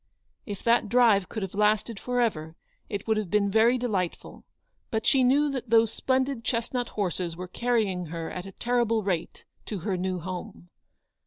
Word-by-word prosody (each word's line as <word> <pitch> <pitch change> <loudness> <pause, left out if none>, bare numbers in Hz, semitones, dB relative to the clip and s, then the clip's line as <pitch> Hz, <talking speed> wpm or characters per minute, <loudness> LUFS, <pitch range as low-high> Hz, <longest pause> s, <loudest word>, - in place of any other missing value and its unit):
If 205 -2 -6
that 230 -2 +3
drive 225 -5 +4
could 220 - -4
have 190 - -5
lasted 210 +1 +1
for 250 0 -2
ever, 160 -8 -1 0.3
it 200 -3 -4
would 220 -1 +1
have 210 -4 -2
been 200 +1 +2
very 225 +4 +4
delightful; 200 -8 -3 0.4
but 220 0 -2
she 265 +1 +4
knew 285 +4 +3
that 255 -3 -5
those 225 -1 +4
splendid 260 -2 0
chestnut 240 +1 -1
horses 180 -4 -2
were 180 0 -6
carrying 205 -5 0
her 165 +1 -5
at 180 +1 -6
a - - -8
terrible 235 -2 +1
rate 180 -4 -3 0.2
to 205 -5 -4
her 190 +1 -1
new 185 0 -2
home. 175 - -7
215 Hz, 175 wpm, -27 LUFS, 185-240 Hz, 0.4 s, drive